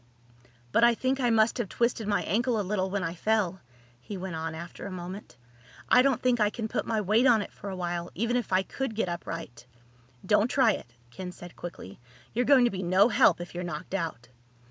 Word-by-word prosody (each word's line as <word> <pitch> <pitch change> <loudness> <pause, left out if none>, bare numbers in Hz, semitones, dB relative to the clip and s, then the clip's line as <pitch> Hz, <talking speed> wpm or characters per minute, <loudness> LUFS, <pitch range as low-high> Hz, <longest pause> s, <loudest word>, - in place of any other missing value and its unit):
"But 230 - +3
I 235 0 +6
think 260 +3 0
I 245 -2 +2
must 225 +1 +3
have 220 -6 -2
twisted 235 -2 0
my 205 -1 +1
ankle 230 +4 +1
a - - 0
little 190 -1 -1
when 200 0 -2
I 165 - -2
fell," 190 -1 0 0.4
he 195 +11 -7
went 185 -1 -5
on 160 0 -4
after 170 +4 -8
a - - -7
moment. 185 - -8 0.5
"I 250 - +7
don't 265 -2 +1
think 250 -2 +3
I 210 -1 +4
can 220 +1 -4
put - - -3
my 225 -1 0
weight 215 +5 +3
on 225 -4 +5
it - - -11
for 200 - -8
a 190 - -4
while, 175 -1 -3
even 230 +4 0
if 245 -4 -1
I 185 +1 +3
could 260 +3 -4
get 205 -4 0
upright." 165 -7 -6 0.6
"Don't 210 +1 +3
try 255 -4 +4
it," 120 - -7 0.2
Ken 180 +7 -6
said 175 0 -12
quickly. 170 - -9 0.3
"You're 245 +2 +1
going 265 -4 +6
to 240 - +2
be 190 - -4
no 190 +5 +4
help 210 - +4
if 175 - -8
you're 175 +1 -4
knocked 175 0 -6
out." 160 -11 -3
200 Hz, 225 wpm, -28 LUFS, 175-230 Hz, 0.6 s, I